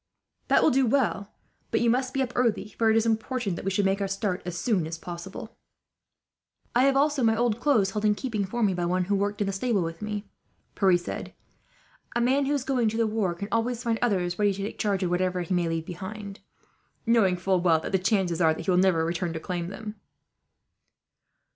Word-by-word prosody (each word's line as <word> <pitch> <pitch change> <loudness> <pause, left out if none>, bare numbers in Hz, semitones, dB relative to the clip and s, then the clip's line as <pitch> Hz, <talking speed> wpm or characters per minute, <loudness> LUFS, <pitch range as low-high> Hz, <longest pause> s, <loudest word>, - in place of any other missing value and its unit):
"That - - +4
will 315 - +5
do 265 0 +3
well; 220 -6 0 0.4
but 225 - +1
you 240 - +2
must 255 +2 +1
be 270 0 0
up 250 -1 -5
early, 230 -4 0
for 225 -1 +4
it 220 - +4
is 225 - +2
important 225 -4 -1
we 195 - 0
should 195 +1 +1
make 195 +1 +1
our 200 - 0
start 195 -1 -2
as 175 -1 -4
soon 195 -7 0
as 165 +1 -5
possible." 175 +6 -8 1.2
"I 255 +3 +5
also 280 +1 +2
have 230 - +4
my 225 - +3
old 235 -1 +1
clothes 230 -9 +2
held 210 +1 -3
in 210 -1 +4
keeping 220 -4 -2
for 230 +5 -2
me, 200 -3 +3
by 175 -1 -1
one 180 +1 +1
who 200 +3 0
worked 205 +1 -1
in - - +2
the 195 - -2
stable 200 -1 0
with 165 +2 -6
me," 210 0 -4 0.5
Pierre 190 -3 +4
said. 175 - -7 0.8
"A - - +2
man 265 +4 +2
who 290 - +1
is 275 - -1
going 250 -5 +1
to 220 - -4
the 230 - +2
war 210 -5 -1
can 200 +4 -5
always 230 +1 0
find 230 -1 0
others 185 -6 0
ready 205 -1 +3
to 195 - -5
take 205 - -6
charge 200 -2 0
of 175 - -1
whatever 180 0 0
he 175 - -3
may 175 -2 +1
leave 165 -1 -2
behind, 195 +3 -7 0.7
knowing 220 -6 +3
full 185 0 +1
well 165 -3 +4
that - - -6
the 190 - +2
chances 185 -3 +1
are 160 -1 +4
that - - -7
he 190 - +2
will 180 - +4
never 180 -4 +3
return 170 0 -2
to 160 - -4
claim 175 0 -4
them." 210 +3 -7
200 Hz, 230 wpm, -26 LUFS, 180-230 Hz, 1.2 s, will